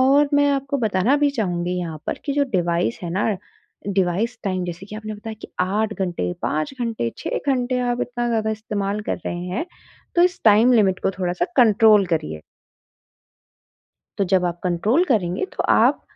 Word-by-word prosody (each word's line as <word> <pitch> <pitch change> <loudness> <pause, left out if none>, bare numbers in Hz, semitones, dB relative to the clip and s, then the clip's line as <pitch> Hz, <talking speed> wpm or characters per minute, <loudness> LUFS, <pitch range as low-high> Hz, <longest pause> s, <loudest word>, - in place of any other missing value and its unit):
और 280 +3 +5
मैं 285 0 +4
आपको 275 +1 -1
बताना 220 +3 +2
भी 290 -1 +2
चाहूँगी 180 -7 -2
यहाँ 165 -3 -4
पर - - -2
कि 280 - 0
जो 285 -1 +3
डिवाइस 170 -8 0
है 170 - -4
ना, 195 +5 0 0.6
डिवाइस 200 +5 0
टाइम 185 -2 -1
जैसे 180 +2 -6
कि 215 - -8
आपने 215 0 -6
बताया 220 +1 -7
कि - - -8
8 210 +4 0
घंटे, 175 - -2
5 155 - -1
घंटे, 225 - -1
6 - - -2
घंटे, 255 -1 +1
आप 245 0 -1
इतना 240 0 -2
ज़्यादा 220 -2 0
इस्तेमाल 210 -2 -3
कर - - 0
रहे 175 - -2
हैं, 185 - -2 0.5
तो 345 - +6
इस 360 0 +2
टाइम 220 +4 +6
लिमिट 195 -4 +3
को - - +3
थोड़ा-सा 180 -1 0
कंट्रोल 215 -4 +6
करिए। 80 - -4 1.8
तो 200 - +2
जब 185 -1 +3
आप 175 0 -3
कंट्रोल 200 - +2
करेंगे, 190 - +1
तो - - -5
आप - - +4
210 Hz, 180 wpm, -22 LUFS, 180-245 Hz, 1.8 s, तो